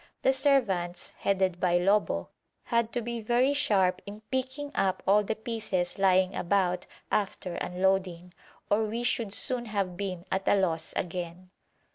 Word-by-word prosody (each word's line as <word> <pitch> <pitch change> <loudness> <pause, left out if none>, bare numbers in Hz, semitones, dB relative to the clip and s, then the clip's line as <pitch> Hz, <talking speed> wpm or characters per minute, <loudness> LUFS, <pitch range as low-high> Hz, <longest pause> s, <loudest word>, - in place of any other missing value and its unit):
The 265 - +4
servants, 235 -11 +1
headed 190 -3 +1
by 175 -1 +3
Lobo, 200 +4 +1 0.3
had 235 -1 0
to 245 - -1
be 235 0 -4
very 245 +5 +2
sharp 195 -11 +2
in 205 +1 -8
picking 265 +2 -2
up 190 -1 0
all 205 +2 +4
the 220 +2 -2
pieces 220 -6 -3
lying 185 -1 +3
about 180 -1 0 0.2
after 195 -3 -1
unloading, 180 -1 -1 0.3
or 215 +2 +2
we 230 +3 -3
should 230 -3 0
soon 245 +3 +1
have 200 -5 -2
been 185 -3 -4
at 190 0 -1
a - - +5
loss 165 -4 -1
again. 180 +1 -5
195 Hz, 150 wpm, -28 LUFS, 180-230 Hz, 0.3 s, a